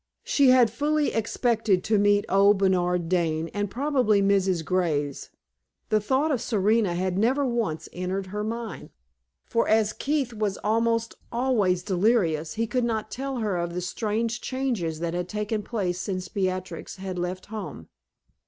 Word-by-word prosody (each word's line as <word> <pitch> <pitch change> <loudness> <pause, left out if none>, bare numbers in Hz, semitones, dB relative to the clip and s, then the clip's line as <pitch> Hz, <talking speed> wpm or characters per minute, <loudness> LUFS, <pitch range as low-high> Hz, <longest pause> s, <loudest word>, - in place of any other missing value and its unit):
She 280 -3 +4
had 250 -4 +6
fully 295 +4 0
expected 225 -3 +1
to 215 -1 +2
meet 205 0 +3
old 200 +1 +5
Bernard 180 -3 +1
Dane, 165 -2 0
and 205 -1 -2
probably 255 -4 +2
Mrs. 195 -4 +2
Graves. 155 -6 -1 0.6
The 215 - +3
thought 265 +9 +1
of 255 -5 0
Serena 215 -4 +2
had 185 +1 -1
never 265 +6 +2
once 220 -11 -2
entered 185 +2 -3
her 210 +3 -4
mind; 225 0 -5 0.6
for 230 - 0
as 215 -1 +3
Keith 280 -4 -1
was 210 -3 -1
almost 230 +1 +1 0.2
always 225 -8 +1
delirious, 180 -5 +1
he 225 +1 0
could 250 +2 -1
not 220 -2 -2
tell 270 +1 -4
her 210 -4 0
of 170 0 -3
the - - -1
strange 220 +5 -2
changes 230 -12 -2
that 170 -1 -2
had 175 0 -3
taken 210 +1 -2
place 185 -5 -2
since 185 -2 -4
Beatrix 185 -2 -3
had 190 -2 -5
left 180 +1 -3
home. 160 - -6
205 Hz, 155 wpm, -26 LUFS, 180-230 Hz, 0.6 s, had